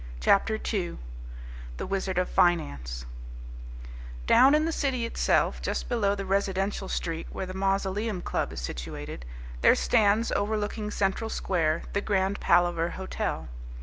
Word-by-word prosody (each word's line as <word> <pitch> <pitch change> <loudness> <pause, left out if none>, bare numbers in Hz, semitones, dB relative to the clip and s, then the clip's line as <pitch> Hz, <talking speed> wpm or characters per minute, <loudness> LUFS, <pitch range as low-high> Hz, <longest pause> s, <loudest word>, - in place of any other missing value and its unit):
CHAPTER 210 - +3
TWO: 195 -5 -3 0.8
The - - -4
Wizard 190 -1 -2
of 180 - +2
Finance 70 - +1 1.2
Down 270 - +6
in 305 +1 +2
the 330 - 0
City 265 -6 -1
itself, 230 - +1
just - - -2
below 205 -4 +1
the 195 -1 -5
residential 195 0 -1
street 165 -1 -3
where 190 - -4
the 185 - -7
Mausoleum 195 +1 -1
Club - - -1
is - - -6
situated, - - -6 0.4
there - - +6
stands 220 0 +3
overlooking 210 0 -1
Central 205 +2 -1
Square 165 -6 0
the 200 - +1
Grand 195 -1 0
Palaver 175 -1 +3
Hotel. 190 - -3
195 Hz, 135 wpm, -27 LUFS, 175-210 Hz, 1.2 s, Down